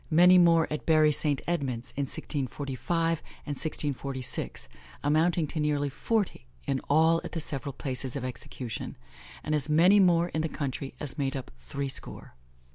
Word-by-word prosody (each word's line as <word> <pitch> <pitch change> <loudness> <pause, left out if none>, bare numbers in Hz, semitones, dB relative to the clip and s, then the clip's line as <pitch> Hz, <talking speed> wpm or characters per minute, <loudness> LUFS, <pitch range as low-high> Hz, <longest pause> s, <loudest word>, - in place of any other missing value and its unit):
Many 180 +3 +7
more 165 -2 +5
at 150 - -5
Bury 155 -1 +5
St. 145 -2 +1
Edmunds, 130 -8 -2
in 140 - -1
1645 145 +5 -2 0.3
and 145 - -3
1646, 140 -3 -1 0.4
amounting 160 +3 +2
to 155 - -4
nearly 145 -1 +1
forty 200 - -2 0.2
in 135 -1 0
all 160 +3 +4
at - - -7
the 165 - -2
several 140 -2 -4
places 130 -1 -2
of 135 -2 -3
execution, 125 -1 -6 0.5
and 155 - -2
as 150 0 0
many 175 +7 +6
more 175 -2 +4
in 155 - -2
the 160 - -1
country 135 -2 -4
as 145 +1 -4
made 135 -1 -1
up 130 - -8
threescore. 135 - -4
150 Hz, 155 wpm, -28 LUFS, 135-165 Hz, 0.5 s, Many